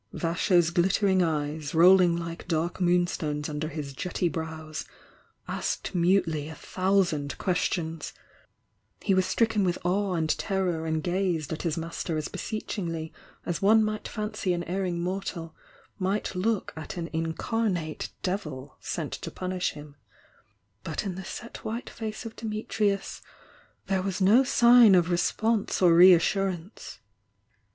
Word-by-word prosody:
Vasho 170 Hz, +2 st, +1 dB
^ 170 Hz, -1 st, +3 dB
ghttering 190 Hz, +2 st, +3 dB
eyes, 150 Hz, -1 st, -2 dB
rolling 175 Hz, 0 st, +6 dB
Uke 170 Hz, 0 st, -6 dB
dark 170 Hz, +1 st, -1 dB
moon^ 175 Hz, -1 st, +3 dB
stones 150 Hz, -3 st, -3 dB
under 150 Hz, 0 st, -3 dB
his 150 Hz, -4 st, -6 dB
jetty 180 Hz, +5 st, -1 dB
brows, 160 Hz, 0 st, -5 dB, 0.6 s
asked -, -, -3 dB
mutely 170 Hz, -4 st, +2 dB
a 160 Hz, -, -9 dB, 0.2 s
thou 195 Hz, +1 st, +4 dB
sand 145 Hz, -5 st, -4 dB
questions; 165 Hz, -3 st, -1 dB, 0.9 s
he 195 Hz, -, +1 dB
was 185 Hz, 0 st, +2 dB
stricken 220 Hz, +1 st, +2 dB
with 175 Hz, -2 st, +1 dB
awe 190 Hz, +1 st, +1 dB
and 160 Hz, -2 st, +1 dB
ter 190 Hz, -2 st, 0 dB
ror 160 Hz, -3 st, -1 dB
and 160 Hz, -1 st, -1 dB
gazed 175 Hz, -5 st, -1 dB
at 160 Hz, -, -5 dB
his 165 Hz, -2 st, -1 dB
master 165 Hz, 0 st, -3 dB
as 155 Hz, -, -3 dB
beseechingly 170 Hz, -7 st, -4 dB, 0.3 s
as 175 Hz, -, -2 dB
one 215 Hz, +3 st, +5 dB
might 215 Hz, 0 st, -2 dB
fancy 210 Hz, -3 st, -2 dB
an 175 Hz, 0 st, -2 dB
erring 180 Hz, 0 st, -2 dB
mortal 175 Hz, -2 st, -4 dB, 0.5 s
might 195 Hz, +2 st, -1 dB
look 200 Hz, +3 st, -1 dB
at 160 Hz, +2 st, -7 dB
an 170 Hz, -, -2 dB
in 160 Hz, 0 st, -2 dB
carnate 180 Hz, -8 st, -2 dB
devil 155 Hz, -9 st, -4 dB
sent -, -, -4 dB
to -, -, -5 dB
punish 185 Hz, -1 st, -2 dB
him, 150 Hz, -1 st, -11 dB, 0.9 s
but -, -, -3 dB
in 195 Hz, -, -2 dB
the 190 Hz, +2 st, -7 dB
set 235 Hz, +5 st, -7 dB
white 230 Hz, +3 st, -5 dB
face 220 Hz, 0 st, -6 dB
of 225 Hz, -, -7 dB
Dumtrius 215 Hz, -2 st, -2 dB, 0.6 s
there 190 Hz, -1 st, 0 dB
was 190 Hz, 0 st, -3 dB
no 210 Hz, +7 st, +6 dB
sign 240 Hz, -5 st, +7 dB
of 175 Hz, -1 st, +3 dB
response 215 Hz, +5 st, +1 dB
or 175 Hz, -3 st, +6 dB
reassurance. 185 Hz, +2 st, +3 dB
180 Hz, 145 wpm, -27 LUFS, 160-195 Hz, 0.9 s, sign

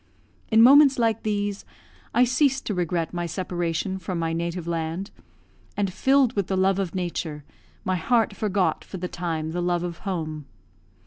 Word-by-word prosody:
In 225 Hz, 0 st, +6 dB
moments 275 Hz, +2 st, +7 dB
like 225 Hz, -2 st, +1 dB
these, 205 Hz, -1 st, -2 dB, 0.5 s
I 245 Hz, -, +4 dB
ceased 265 Hz, +2 st, +2 dB
to 210 Hz, -, -1 dB
regret 175 Hz, -2 st, -1 dB
my 175 Hz, -1 st, -2 dB
separation 175 Hz, +1 st, -2 dB
from 180 Hz, 0 st, -4 dB
my 165 Hz, -1 st, -1 dB
native 170 Hz, +1 st, -3 dB
land; 170 Hz, +3 st, -3 dB, 0.7 s
and, 200 Hz, -3 st, 0 dB
filled 265 Hz, 0 st, +3 dB
with 200 Hz, -3 st, 0 dB
the 190 Hz, -, -1 dB
love 190 Hz, +1 st, +2 dB
of 190 Hz, -2 st, -3 dB
Nature, 170 Hz, -4 st, -3 dB, 0.4 s
my 185 Hz, 0 st, +1 dB
heart 225 Hz, +3 st, +1 dB
forgot 200 Hz, -2 st, 0 dB
for 190 Hz, -, -8 dB
the 180 Hz, 0 st, -3 dB
time 165 Hz, -3 st, -3 dB
the 175 Hz, +2 st, -2 dB
love 175 Hz, 0 st, 0 dB
of 175 Hz, -1 st, -5 dB
home. 155 Hz, -6 st, -4 dB
185 Hz, 170 wpm, -25 LUFS, 170-210 Hz, 0.7 s, moments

